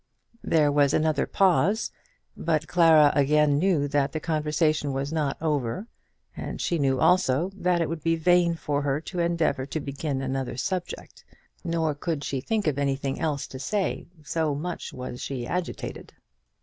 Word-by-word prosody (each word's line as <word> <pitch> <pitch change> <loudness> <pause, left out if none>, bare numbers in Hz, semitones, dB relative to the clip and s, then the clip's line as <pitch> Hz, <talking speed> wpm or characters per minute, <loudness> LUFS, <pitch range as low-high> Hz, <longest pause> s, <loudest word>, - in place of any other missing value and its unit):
There 150 -3 +3
was 145 -1 +3
another 155 -2 +1
pause; 195 +3 +2 0.4
but 160 -1 -1
Clara 160 -4 +6
again 145 0 +3
knew 165 -5 +2
that 140 -1 +1
the 155 - -2
conversation 155 -2 0
was 140 +3 -3
not 150 -4 -1
over; 145 - -1 0.5
and - - -6
she 170 - 0
knew 135 -2 +1
also 180 0 +3
that 180 -2 +1
it 165 - +1
would 165 0 -4
be 165 +2 +2
vain 170 +1 +3
for 145 -3 -2
her 140 0 0
to 175 +3 -6
endeavour 165 -6 0
to 155 - -3
begin 140 0 -3
another 130 -2 -3
subject. 180 +6 -4 0.4
Nor 165 -3 0
could 145 0 -3
she 135 -2 -2
think 215 +7 -1
of 145 -3 0
anything 135 -1 -1
else 150 -4 -1
to 130 - -8
say, 200 +7 -2 0.2
so 150 +1 -1
much 170 +4 -5
was 125 -1 -7
she 130 -3 -4
agitated. 180 +6 -5
150 Hz, 160 wpm, -26 LUFS, 140-170 Hz, 0.5 s, Clara